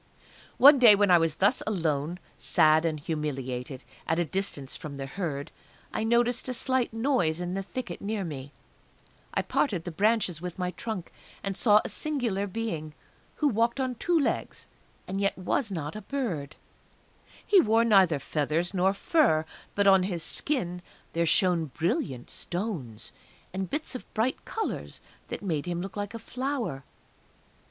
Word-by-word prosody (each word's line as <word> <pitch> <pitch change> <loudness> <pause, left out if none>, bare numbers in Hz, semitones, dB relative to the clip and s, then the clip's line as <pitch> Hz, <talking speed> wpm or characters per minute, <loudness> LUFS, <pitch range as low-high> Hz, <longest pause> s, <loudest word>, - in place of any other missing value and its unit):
One 280 +1 +9
day 230 -4 +9
when 200 -2 +3
I 175 - +7
was 165 -2 +1
thus 200 +7 +3
alone, 165 -5 -1 0.2
sad 155 +1 +4
and 155 -2 -1
humiliated, 135 -4 -4 0.2
at 160 - +1
a 175 - +1
distance 155 -6 -2
from 145 -3 -7
the 135 - -4
Herd, 145 -2 -4 0.4
I - - -1
noticed 240 +2 +2
a 255 - -2
slight 260 0 +1
noise 225 - +1
in 180 0 -3
the 195 - -1
thicket, 200 -2 -6
near 205 0 -2
me. 140 -5 -6 0.8
I - - +1
parted 190 - 0
the 175 - -5
branches 200 -3 +1
with 180 -1 -6
my 180 -1 -1
trunk, 190 -1 -5 0.3
and 195 -1 -2
saw 210 0 +5
a - - -3
singular 235 -10 -2
being, 175 -8 -4 0.4
who 300 - +1
walked 235 +1 +1
on 260 -1 0
two 335 +7 +1
legs 285 - -2 0.4
and 195 +2 -2
yet 200 - +1
was 205 +6 -1
not 160 -4 -4
a 215 - -5
bird. 195 - -3 0.9
He 395 -3 +6
wore 225 +1 +3
neither 190 -8 +5
feathers 155 +5 -1
nor 190 +1 +2
fur; 195 - +3 0.3
but 200 - +2
on 190 -1 +7
his 180 -3 -2
skin 180 - -1 0.3
there 170 0 +1
shone 180 -2 +3
brilliant 140 -4 -2
stones, 175 - -4 0.4
and 190 0 -3
bits 300 0 -2
of 255 - -8
bright 235 +4 0
colours 445 - -4 0.3
that - - -5
made 160 -5 -2
him 175 -1 -2
look 190 +1 -6
like 205 +2 -4
a - - -3
flower! 245 - -3
190 Hz, 160 wpm, -28 LUFS, 160-230 Hz, 0.9 s, One